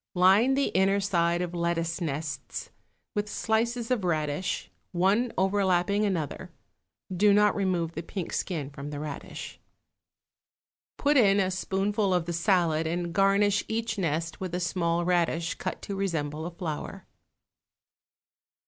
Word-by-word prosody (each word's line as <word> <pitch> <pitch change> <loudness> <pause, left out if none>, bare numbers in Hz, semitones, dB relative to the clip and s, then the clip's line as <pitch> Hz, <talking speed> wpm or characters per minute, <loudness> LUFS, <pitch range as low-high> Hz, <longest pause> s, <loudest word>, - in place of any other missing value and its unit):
Line 195 +9 +5
the 275 0 +1
inner 195 +1 +3
side 175 -3 +1
of 175 -1 -5
lettuce 170 0 -1
nests 145 -4 -4 0.4
with 210 0 -2
slices 230 +3 0
of 240 -6 +1
radish, 155 0 -1 0.2
one 200 +7 +2
overlapping 195 +1 +2
another 170 -8 -2 0.7
(do 205 +3 +5
not 210 0 +4
remove 180 -4 0
the 165 - -5
pink 175 +1 -5
skin 150 -7 -2
from 140 +1 -7
the 145 -1 -5
radish). 150 -1 -7 1.4
Put 290 0 +3
in 200 -5 +5
a 190 -1 +1
spoonful 195 +1 0
of 175 -2 0
the 170 - -3
salad 165 -2 +2
and 170 +1 -2
garnish 200 +2 +3
each 225 -1 -2
nest 165 -1 -1
with 180 -2 -3
a - - -1
small 175 -1 0
radish 170 -2 +1
cut - - -4
to 200 - -4
resemble 160 -5 -2
a - - -6
flower. 165 -5 -5
180 Hz, 140 wpm, -28 LUFS, 165-200 Hz, 1.4 s, Line